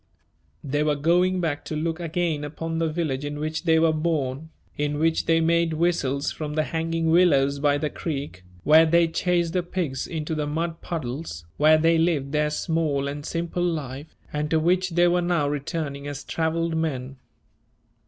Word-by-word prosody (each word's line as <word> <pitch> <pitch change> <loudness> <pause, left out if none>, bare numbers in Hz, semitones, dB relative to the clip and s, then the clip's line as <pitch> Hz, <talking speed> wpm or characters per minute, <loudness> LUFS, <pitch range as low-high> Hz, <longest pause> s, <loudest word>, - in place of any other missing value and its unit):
They 145 +1 -1
were 150 -1 +2
going 180 +5 +2
back 160 -3 -2
to 155 - -4
look 160 +2 -2
again 165 -2 -1
upon 165 +2 -4
the 165 -1 +1
village 155 -5 -2
in 145 0 -4
which 155 +3 -3
they 160 -1 +4
were 160 0 +3
born, 155 -2 -2 0.3
in 145 0 -1
which 160 +1 +1
they 165 0 +4
made 170 0 +2
whistles 155 -4 0
from 150 -1 -5
the 155 - +2
hanging 165 0 -1
willows 140 -5 +4
by 145 0 +2
the 150 0 -2
creek, 140 - -5 0.2
where 160 +2 +6
they 170 +1 +4
chased 170 0 0
the 180 - +2
pigs 170 -6 -3
into 160 -1 -4
the 150 -1 -2
mud 165 +2 -3
puddles, 130 - -5
where 155 +1 +6
they 165 +1 +3
lived 155 -5 +1
their 150 0 +1
small 150 -3 -1
and 145 +1 -5
simple 170 +1 -2
life, 150 -4 -3 0.2
and 150 0 -1
to 160 - +2
which 180 +3 +2
they 175 +1 +3
were 175 +1 +2
now 170 -4 +1
returning 145 0 -3
as 145 -1 -6
travelled 165 0 -1
men. 135 -5 -3
160 Hz, 180 wpm, -24 LUFS, 145-165 Hz, 0.3 s, where